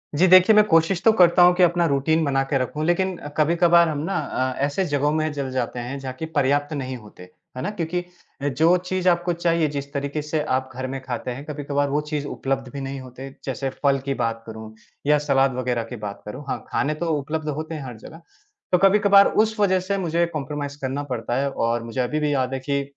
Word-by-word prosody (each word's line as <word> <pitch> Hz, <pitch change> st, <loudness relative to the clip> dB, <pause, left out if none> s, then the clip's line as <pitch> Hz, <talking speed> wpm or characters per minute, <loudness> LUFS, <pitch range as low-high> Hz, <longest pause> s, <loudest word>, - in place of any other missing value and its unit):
जी। 180 Hz, +6 st, +4 dB
देखिए, 185 Hz, +4 st, +7 dB
मैं 210 Hz, -, +7 dB
कोशिश 165 Hz, 0 st, +2 dB
तो 225 Hz, -, +8 dB
करता 180 Hz, -3 st, +5 dB
हूँ 180 Hz, 0 st, +7 dB
कि 180 Hz, -, +4 dB
अपना 175 Hz, 0 st, +3 dB
रूटीन 155 Hz, +3 st, +1 dB
बनाकर 135 Hz, -1 st, 0 dB
रखूँ 150 Hz, +5 st, -3 dB
लेकिन, 185 Hz, +2 st, +1 dB, 0.2 s
कभी-कबार 170 Hz, +2 st, +4 dB
हम 150 Hz, -, -2 dB
ना 195 Hz, +4 st, -2 dB
अ, 130 Hz, 0 st, -2 dB
ऐसे 145 Hz, +7 st, -1 dB
जगहों 145 Hz, -2 st, +1 dB
में 155 Hz, 0 st, 0 dB
जल 140 Hz, -2 st, -3 dB
जाते 125 Hz, -1 st, -2 dB
हैं 125 Hz, +3 st, -5 dB
जहाँ 130 Hz, -1 st, -6 dB
की 160 Hz, -, -3 dB
पर्याप्त 145 Hz, +3 st, +1 dB
नहीं 130 Hz, -2 st, -4 dB
होते, 105 Hz, -5 st, -14 dB, 0.3 s
है -, -, -3 dB
ना? 145 Hz, -, -2 dB
क्योंकि 175 Hz, -3 st, -3 dB, 0.5 s
जो 160 Hz, +6 st, +3 dB
चीज़ 185 Hz, 0 st, 0 dB
आपको 175 Hz, 0 st, +1 dB
चाहिए, 170 Hz, -1 st, +1 dB
जिस 140 Hz, -1 st, -5 dB
तरीके 140 Hz, +2 st, -2 dB
से 155 Hz, +1 st, -2 dB
आप 130 Hz, 0 st, -2 dB
घर 130 Hz, +1 st, -4 dB
में 135 Hz, +1 st, -4 dB
खाते 125 Hz, -1 st, -4 dB
हैं 135 Hz, +4 st, -7 dB
कभी-कभार 145 Hz, -1 st, -2 dB
वो 145 Hz, +2 st, 0 dB
चीज़ 150 Hz, -2 st, -2 dB
उपलब्ध 135 Hz, -2 st, -3 dB
भी 140 Hz, -, -5 dB
नहीं 135 Hz, 0 st, -5 dB
होते 130 Hz, +1 st, -9 dB, 0.2 s
जैसे 135 Hz, 0 st, -3 dB
फल 140 Hz, -1 st, +3 dB
की 140 Hz, -, 0 dB
बात 115 Hz, 0 st, -2 dB
करूँ 110 Hz, -1 st, -9 dB, 0.3 s
या 150 Hz, 0 st, +5 dB
सलाद 135 Hz, -1 st, +3 dB
वग़ैरह 125 Hz, -2 st, -1 dB
की -, -, -4 dB
बात 105 Hz, -3 st, -7 dB
करूँ, 125 Hz, +7 st, -7 dB
हाँ, -, -, -3 dB
खाने 150 Hz, -, 0 dB
तो -, -, -1 dB
उपलब्ध 155 Hz, +2 st, -4 dB
होते 155 Hz, +2 st, -4 dB
हैं 155 Hz, -, -6 dB
हर 125 Hz, -3 st, -8 dB
जगह। 160 Hz, +9 st, -12 dB, 0.5 s
तो 180 Hz, -, +5 dB
कभी-कभार 200 Hz, +1 st, +6 dB, 0.2 s
उस 220 Hz, -1 st, -4 dB
वज़ह 190 Hz, -2 st, +3 dB
से 195 Hz, +2 st, -2 dB
मुझे 170 Hz, -2 st, +1 dB
कोम्प्रोमाईज़ 145 Hz, -1 st, -4 dB
करना 135 Hz, +2 st, -2 dB
पड़ता 120 Hz, -4 st, -3 dB
है 140 Hz, -, 0 dB
और 115 Hz, -2 st, -1 dB
मुझे 115 Hz, +2 st, -3 dB
अभी 140 Hz, +5 st, -1 dB
भी 150 Hz, -1 st, 0 dB
याद 130 Hz, -1 st, 0 dB
है 135 Hz, -, -2 dB
कि 140 Hz, +1 st, -1 dB
145 Hz, 225 wpm, -23 LUFS, 130-170 Hz, 0.5 s, तो